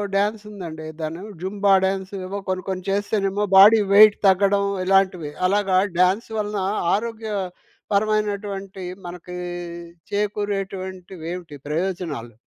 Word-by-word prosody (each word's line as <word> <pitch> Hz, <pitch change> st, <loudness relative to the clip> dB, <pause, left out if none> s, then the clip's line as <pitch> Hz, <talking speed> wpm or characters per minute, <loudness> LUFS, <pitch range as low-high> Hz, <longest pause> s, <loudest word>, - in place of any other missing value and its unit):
Dance 210 Hz, +1 st, +1 dB
ఉందండి. 160 Hz, -6 st, -7 dB
దాన్ని 160 Hz, +3 st, -4 dB, 0.2 s
Zumba 200 Hz, +1 st, +2 dB
dance 190 Hz, 0 st, -2 dB
ఏవో 200 Hz, +2 st, -4 dB
కొన్ని 185 Hz, -1 st, -2 dB
కొన్ని 185 Hz, -1 st, -4 dB
చేస్తేనేమో 205 Hz, 0 st, 0 dB
బాడీ 210 Hz, +3 st, +9 dB
వెయిట్ 210 Hz, 0 st, +8 dB
తగ్గడం, 200 Hz, +1 st, +3 dB, 0.2 s
ఇలాంటివి. 185 Hz, -5 st, +2 dB, 0.2 s
అలాగా 195 Hz, -1 st, +2 dB, 0.2 s
డ్యాన్స్ 185 Hz, +6 st, +2 dB
వలన 210 Hz, -1 st, -2 dB, 0.3 s
ఆరోగ్య 225 Hz, 0 st, -4 dB, 0.6 s
పరమైనటువంటి 200 Hz, -2 st, -1 dB, 0.2 s
మనకి 180 Hz, 0 st, -8 dB, 0.8 s
చేకూరేటువంటివేమిటి 190 Hz, -5 st, -4 dB
ప్రయోజనాలు? 160 Hz, -7 st, -3 dB
195 Hz, 100 wpm, -23 LUFS, 185-205 Hz, 0.8 s, బాడీ